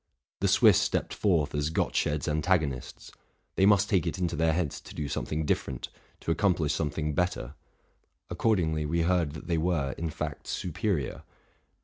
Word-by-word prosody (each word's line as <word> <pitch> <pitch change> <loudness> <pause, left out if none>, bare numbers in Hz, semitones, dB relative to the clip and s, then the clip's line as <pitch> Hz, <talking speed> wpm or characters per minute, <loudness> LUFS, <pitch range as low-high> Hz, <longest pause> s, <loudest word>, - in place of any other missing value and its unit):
The - - +1
Swiss - - +6
stepped - - -1
forth 85 -8 +1
as 75 +1 0
Gottsched's 75 -2 0
antagonists: 75 -4 -1 0.4
they 95 - +4
must 100 -1 +5
take 95 -6 +1
it - - -2
into 90 -3 -1
their 80 +2 +2
heads 80 -3 -2
to - - -12
do 75 - -3
something 75 +2 -2
different, 65 -3 -2 0.3
to - - -1
accomplish 85 -4 +2
something 75 -1 -1
better; 80 -7 -1 0.7
accordingly 80 -8 +1
we 85 +2 +1
heard 85 -4 +1
that 75 - -9
they 85 -2 0
were, 80 -5 0
in 80 0 -2
fact, - - -5
superior. 90 - -2
80 Hz, 155 wpm, -28 LUFS, 75-90 Hz, 0.7 s, Swiss